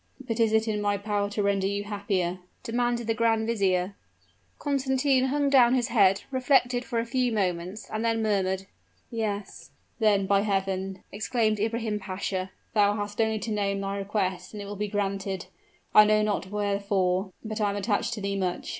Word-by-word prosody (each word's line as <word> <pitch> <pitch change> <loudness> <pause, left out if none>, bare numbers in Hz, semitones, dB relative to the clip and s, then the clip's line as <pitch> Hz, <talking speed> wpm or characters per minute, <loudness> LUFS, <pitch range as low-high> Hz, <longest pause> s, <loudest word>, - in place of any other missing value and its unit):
"But 240 -3 -4
is 225 -1 +4
it 220 +1 +2
in 210 -1 -1
my 205 0 +1
power 205 0 -1
to 205 0 -1
render 200 -1 +1
you 200 +1 -2
happier?" 195 -3 -2 0.2
demanded 240 -1 0
the 225 - +1
grand 225 0 +2
vizier. 195 -4 +1 0.6
Constantine 265 -1 +1
hung 285 +2 +1
down 255 -3 +6
his 245 -2 0
head 195 -4 +4
reflected 255 -2 +2
for 240 -1 -4
a 230 - +1
few 250 +1 0
moments, 185 0 -2
and 215 +1 -3
then 225 -1 +1
murmured 190 -2 0 0.5
"Yes." 210 -3 -4 0.3
"Then, 205 -3 +3
by 200 +1 +3
Heaven!" 195 -2 -2
exclaimed 215 0 0
Ibrahim 220 0 -1
Pasha, 190 -1 -3 0.2
"thou 205 -2 +4
hast 205 +1 -2
only 220 0 +1
to 220 +1 -4
name 200 -1 0
thy 195 0 -3
request, 195 -2 -2
and 210 - -6
it - - -8
will 205 +1 -6
be 210 +1 -2
granted. 195 -2 -2 0.5
I 210 - +9
know 215 0 +3
not 205 -3 -1
wherefore, 200 -2 0
but 215 0 -3
I 205 - +2
am 200 - -2
attached 205 +3 0
to 210 - -6
thee 200 0 -1
much. 185 -2 -2
205 Hz, 180 wpm, -27 LUFS, 195-225 Hz, 0.6 s, I